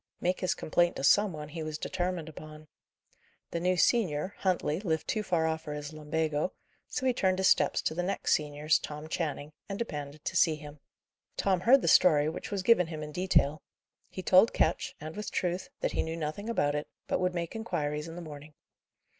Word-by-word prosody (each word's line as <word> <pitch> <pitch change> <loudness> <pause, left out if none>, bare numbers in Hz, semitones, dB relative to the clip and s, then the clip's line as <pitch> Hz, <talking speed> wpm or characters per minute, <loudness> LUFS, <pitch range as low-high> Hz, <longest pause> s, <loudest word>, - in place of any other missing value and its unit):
Make 180 +1 0
his 185 - 0
complaint 175 +2 +1
to - - -5
some 205 +7 +5
one, 150 -2 -7
he 160 +2 -6
was 155 -1 -4
determined 180 -2 -3
upon. 155 0 -11 0.8
The 170 - -2
new 180 +1 +1
senior, 185 -4 +2
Huntley, 175 -4 0
lived 160 -6 -2
too 215 - 0
far 175 -5 +1
off 160 0 -1
for 150 -2 -6
his 150 +1 -6
lumbago; 155 +1 -1 0.3
so 260 - -3
he 255 - +3
turned 190 -5 +1
his 190 +1 +4
steps - - +3
to - - 0
the 175 - -1
next 185 +2 -1
senior's, 150 -1 +1
Tom 150 +1 -7
Channing, 155 -3 -3 0.2
and 195 - -3
demanded 150 -9 -5
to - - -3
see 165 -3 +4
him. 150 0 -11 0.6
Tom 190 -2 +2
heard 250 +8 +5
the - - 0
story, 150 -4 +6
which 160 - -6
was 200 -3 -2
given 180 -4 +5
him 155 -2 -6
in 150 - -7
detail. 155 -4 +2 0.5
He 185 - -7
told 190 +6 +6
Ketch - - 0
and 155 +1 -7
with 210 -1 -4
truth 180 +1 -2
that - - 0
he - - 0
knew 160 +1 -4
nothing 165 +8 -4
about 145 -11 +1
it, 150 0 -3 0.2
but - - 0
would 180 0 0
make 170 +2 -3
inquiries 150 -9 -2
in 165 - -8
the 175 - -7
morning. 150 -1 -10
160 Hz, 205 wpm, -30 LUFS, 150-185 Hz, 0.8 s, story